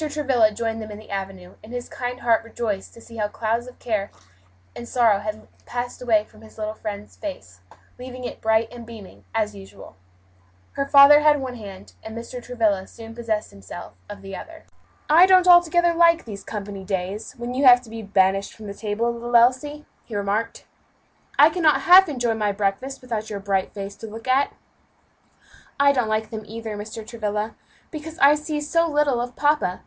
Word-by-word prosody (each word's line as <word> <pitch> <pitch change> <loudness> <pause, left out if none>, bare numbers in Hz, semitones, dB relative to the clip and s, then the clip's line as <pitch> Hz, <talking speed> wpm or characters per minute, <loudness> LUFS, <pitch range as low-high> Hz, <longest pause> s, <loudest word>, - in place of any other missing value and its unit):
Travilla 265 -7 +2
joined 225 +1 -3
them 215 - -7
in 205 - -8
the 215 - -13
avenue, 190 -2 -6
and 215 - -12
his 245 0 -5
kind 250 0 -5
heart 230 -1 +2
rejoiced 225 -4 -4
to 230 - -14
see 230 0 -12
how 210 -1 0
the - - -20
clouds 230 +2 -1
of 250 - -12
care 210 -4 -2 0.7
and 240 - -8
sorrow 230 -5 +3
had 210 +1 -4
all 215 - -19 0.2
passed 245 +1 -5
away 220 -4 +2
from 215 - -19
his 220 0 -16
little 215 0 -3
friend's 210 -1 -7
face, 90 - -8 0.4
leaving 255 0 -8
it 245 - -7
bright 220 0 +2
and 240 -1 -10
beaming, 225 -4 -12
as 215 -2 -1
usual. 195 -1 -13 0.8
Her 275 - -1
father 280 +1 +8
had 300 -1 +4
one 260 -2 -5
hand, 200 -4 -11
and 220 +1 -8
Mr. 235 +2 -7
Travilla 215 -6 0
soon 225 -1 -11
possessed 220 -3 -3
himself 100 - -10 0.2
of 200 -1 -9
the 195 0 -7
other. 325 -1 -11 0.4
"I 335 +5 +7
don't 370 -1 +5
altogether 345 -1 +5
like 335 0 +4
these 200 -3 -8
company 200 -2 -6
days, 190 +2 -4
when 240 +1 -5
you 265 +3 -1
have 245 -1 +8
to 230 - -14
be 225 0 -6
banished 195 -1 +1
from 220 - -12
the 200 - -6
table, 220 +3 -2
little 240 +1 -4
Elsie," 260 +5 +3 0.2
he 225 - -9
remarked. 205 +3 -2 0.7
"I 295 +3 +7
cannot 315 -3 +3
half 370 +1 +7
enjoy 245 -5 0
my 210 -2 0
breakfast 200 +7 -2
without 225 -3 -4
your 205 -2 -4
bright 195 -1 -1
face 200 -1 -7
to 225 - -8
look 225 +3 -10
at." 265 +2 +2 1.3
"I 280 0 +6
don't 250 -5 0
like 215 0 -1
them 220 -1 -6
either, 225 0 -6
Mr. 215 +2 -7
Travilla, 215 -1 -3 0.4
because 315 +1 -8
I 280 +1 +7
see 300 0 -3
so 335 +3 +1
little 290 -5 +1
of 245 0 -5
papa. 290 -11 +1
230 Hz, 195 wpm, -23 LUFS, 210-260 Hz, 1.3 s, father